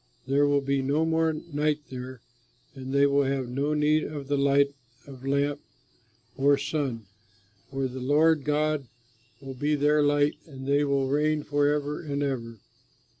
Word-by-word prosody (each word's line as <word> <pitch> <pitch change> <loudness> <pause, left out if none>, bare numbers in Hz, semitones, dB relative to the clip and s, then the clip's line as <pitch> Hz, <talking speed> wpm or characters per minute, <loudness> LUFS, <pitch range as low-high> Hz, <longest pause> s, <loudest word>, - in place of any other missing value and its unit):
There 140 +2 +2
will 145 0 +2
be 140 0 0
no 145 +4 +1
more 160 0 +2
night 150 -1 -2
there, 130 -1 -7 0.5
and 130 -1 -7
they 140 +1 +4
will 140 0 +3
have 135 -1 -1
no 140 +4 -1
need 150 +1 +2
of 145 -2 -6
the 145 - +2
light 140 0 +3 0.3
of 130 -2 -12
lamp 140 +1 0 0.7
or 140 +1 +3
sun, 135 -6 -3 0.6
for 135 0 -2
the 130 +1 -7
Lord 150 +3 +3
God 150 -1 0 0.5
will 135 -1 -7
be 145 +4 0
their 150 +1 +3
light, 145 0 +2
and 135 -3 -10
they 140 +1 +2
will 140 -2 +1
reign 150 +2 +1
forever 145 0 0
and 145 -3 -3
ever. 115 -5 -3
140 Hz, 160 wpm, -27 LUFS, 135-150 Hz, 0.7 s, they